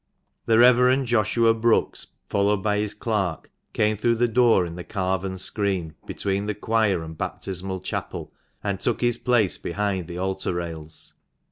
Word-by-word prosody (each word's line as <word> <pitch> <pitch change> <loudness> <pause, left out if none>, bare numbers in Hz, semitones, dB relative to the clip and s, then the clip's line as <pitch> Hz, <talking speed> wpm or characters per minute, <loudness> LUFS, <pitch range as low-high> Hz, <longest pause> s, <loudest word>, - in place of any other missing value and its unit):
The 115 - +4
Rev. 125 +2 +5
Joshua 115 0 +3
Brookes, 115 0 +1 0.2
followed 100 0 +1
by 105 -1 +1
his 105 0 -2
clerk, 105 -6 -2 0.2
came 110 0 +1
through 115 +3 +1
the 120 +1 +2
door 115 -5 +4
in 85 - -6
the 90 - -6
carven 95 -1 -2
screen, 95 -4 -1
between 100 +1 -2
the 105 - -2
choir 105 -5 +1
and 80 0 -8
baptismal 95 +2 -4
chapel, - - -5 0.3
and 100 -2 -2
took 120 - -1
his 120 -1 +1
place 120 -6 +2
behind 95 -1 -2
the 85 -1 -7
altar 95 -1 -2
rails. 80 -2 -6
100 Hz, 155 wpm, -24 LUFS, 95-115 Hz, 0.3 s, Rev